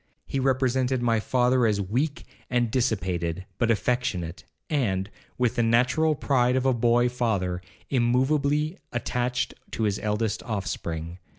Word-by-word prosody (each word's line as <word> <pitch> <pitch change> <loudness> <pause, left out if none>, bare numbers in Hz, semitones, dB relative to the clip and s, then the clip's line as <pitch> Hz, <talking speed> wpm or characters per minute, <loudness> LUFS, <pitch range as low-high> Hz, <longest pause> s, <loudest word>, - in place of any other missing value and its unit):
He 135 - -2
represented 130 -1 +1
my 115 -2 +3
father 125 +1 +2
as 105 -2 +1
weak 125 - -1 0.2
and 120 -2 +1
dissipated, 95 -7 -1
but 120 - +2
affectionate; 105 -7 -1 0.2
and, 105 -9 0 0.3
with 125 -1 +1
the - - +4
natural 125 +7 +3
pride 125 -3 +2
of 130 0 +1
a 130 - +4
boy 120 +1 +3
father, 105 -8 -1 0.3
immoveably 140 +5 +2
attached 125 0 -1 0.2
to 115 - -1
his 105 -2 +1
eldest 105 0 -1
offspring. 85 -6 -4
120 Hz, 130 wpm, -26 LUFS, 105-130 Hz, 0.3 s, the